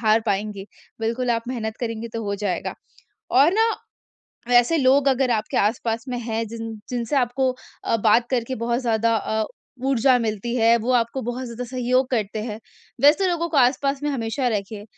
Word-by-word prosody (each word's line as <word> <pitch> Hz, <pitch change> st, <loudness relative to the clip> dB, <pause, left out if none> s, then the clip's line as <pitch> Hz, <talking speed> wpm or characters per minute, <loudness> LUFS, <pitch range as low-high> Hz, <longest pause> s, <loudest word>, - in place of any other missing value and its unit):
हार 220 Hz, 0 st, +4 dB
पाएँगे। 200 Hz, -1 st, -2 dB, 0.4 s
बिल्कुल 235 Hz, +2 st, -1 dB
आप 230 Hz, -1 st, +1 dB
मेहनत 220 Hz, -3 st, -3 dB
करेंगे 230 Hz, -1 st, -3 dB
तो 225 Hz, -, -3 dB
हो 200 Hz, 0 st, -1 dB
जाएगा। 195 Hz, -3 st, -2 dB, 0.6 s
और 280 Hz, +7 st, +5 dB
ना 450 Hz, +2 st, +4 dB, 0.8 s
वैसे 245 Hz, +6 st, +4 dB
लोग 275 Hz, +1 st, +4 dB
अगर 265 Hz, -1 st, +2 dB
आपके 220 Hz, -2 st, -1 dB
आस-पास 225 Hz, +1 st, 0 dB
में 245 Hz, -1 st, -2 dB
हैं, 225 Hz, -1 st, -2 dB
जिन 225 Hz, 0 st, -6 dB, 0.2 s
जिनसे 245 Hz, +2 st, -2 dB
आपको 260 Hz, +1 st, +1 dB, 0.3 s
अ, 230 Hz, -, +2 dB
बात 225 Hz, +2 st, +3 dB
करके 255 Hz, 0 st, -1 dB
बहुत 235 Hz, +1 st, 0 dB
ज़्यादा 230 Hz, -2 st, +1 dB
अ, 220 Hz, 0 st, -1 dB, 0.4 s
ऊर्जा 255 Hz, -1 st, +4 dB
मिलती 225 Hz, +1 st, -2 dB
है 230 Hz, 0 st, +5 dB
वो 235 Hz, +3 st, -1 dB
आपको 235 Hz, +3 st, -2 dB
बहुत 245 Hz, +3 st, -4 dB
ज़्यादा 235 Hz, +1 st, -6 dB
सहयोग 255 Hz, 0 st, +1 dB
करते 215 Hz, -3 st, -1 dB
हैं, 215 Hz, -1 st, -5 dB, 0.4 s
वैसे 300 Hz, +7 st, +5 dB
लोगों 340 Hz, -1 st, -1 dB
को 310 Hz, -, -3 dB
आस-पास 275 Hz, +2 st, +2 dB
में 295 Hz, -, 0 dB
हमेशा 250 Hz, 0 st, -2 dB
रखिए, 205 Hz, -1 st, -3 dB
235 Hz, 175 wpm, -23 LUFS, 225-260 Hz, 0.8 s, और